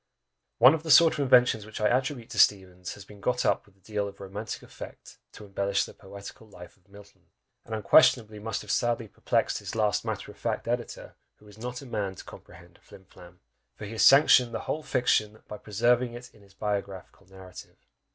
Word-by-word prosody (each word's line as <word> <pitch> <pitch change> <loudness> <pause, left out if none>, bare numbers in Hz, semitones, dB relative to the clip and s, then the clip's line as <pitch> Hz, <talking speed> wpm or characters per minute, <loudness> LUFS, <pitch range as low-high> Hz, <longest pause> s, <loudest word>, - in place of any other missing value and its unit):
One 125 +5 +7
of 160 - -2
the 160 - -8
sort 165 +1 +7
of - - -6
inventions 125 -5 +4
which 110 +1 -9
I 105 - +2
attribute 130 -2 -3
to 105 - -4
Steevens 90 -3 +1
has 100 - -13
been 100 0 -15
got 125 +2 -1
up - - 0
with 100 - -24
a - - -32
deal 105 +1 -3
of 100 0 -11
romantic 100 +3 -7
effect, - - -12
to 105 - -12
embellish 100 0 -1
the - - -12
poetical 100 +3 -12
life 90 -4 -14
of 95 0 -34
Milton; 100 -3 -18 0.4
and 110 - -5
unquestionably 110 0 +4
must 110 0 -4
have 105 - -5
sadly 120 -2 0
perplexed - - -1
his - - -7
last 105 -2 +1
matter - - -5
of - - -20
fact - - -3
editor, 120 0 -4 0.2
who 105 - -21
is 105 +1 -16
not 125 +3 -6
a - - -11
man 105 -6 -4
to - - -11
comprehend 85 0 -15
a - - -31
flim 95 - -17
flam! 90 0 -17 0.3
for - - -9
he 100 - -8
has 115 - 0
sanctioned 135 -3 +6
the - - -3
whole 155 - -3
fiction, 110 -6 0
by 105 - -8
preserving 120 +3 0
it 125 +1 -11
in - - -21
his 100 -1 -22
biographical 100 -2 -5
narrative! 95 -1 -13
105 Hz, 210 wpm, -27 LUFS, 100-120 Hz, 0.4 s, One